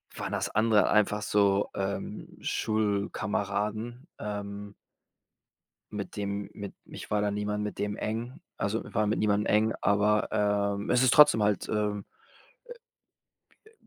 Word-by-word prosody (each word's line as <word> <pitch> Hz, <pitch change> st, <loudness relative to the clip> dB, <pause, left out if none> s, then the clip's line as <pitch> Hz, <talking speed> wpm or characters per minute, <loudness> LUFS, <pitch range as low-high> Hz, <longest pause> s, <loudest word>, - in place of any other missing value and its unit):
waren -, -, -4 dB
das -, -, -1 dB
andere 110 Hz, -2 st, +3 dB
einfach 105 Hz, 0 st, +3 dB
so, 100 Hz, -1 st, +2 dB
ähm, 100 Hz, 0 st, -4 dB
Schulkameraden, 105 Hz, -, -1 dB
ähm 100 Hz, -1 st, -5 dB, 1.2 s
mit 105 Hz, -2 st, -5 dB
dem 100 Hz, -1 st, -3 dB
mit 100 Hz, -2 st, -7 dB
ich -, -, -10 dB
war 105 Hz, -1 st, +2 dB
da 105 Hz, -, +1 dB
niemand 105 Hz, 0 st, -2 dB
mit 105 Hz, -, -4 dB
dem 105 Hz, 0 st, -1 dB
eng. 120 Hz, +6 st, -4 dB, 0.2 s
Also, 105 Hz, +3 st, -1 dB
war 105 Hz, 0 st, +2 dB
mit 105 Hz, -, 0 dB
niemandem 105 Hz, 0 st, +2 dB
eng, 110 Hz, +1 st, +3 dB
aber, 105 Hz, +1 st, +3 dB, 0.5 s
ähm, 100 Hz, -, -5 dB
es 125 Hz, +1 st, +4 dB
ist 130 Hz, -, +5 dB
trotzdem 145 Hz, -7 st, +7 dB
halt, 105 Hz, -2 st, +1 dB
ähm, 105 Hz, -1 st, -1 dB, 1.8 s
äh, -, -, -28 dB
105 Hz, 135 wpm, -29 LUFS, 100-110 Hz, 1.8 s, trotzdem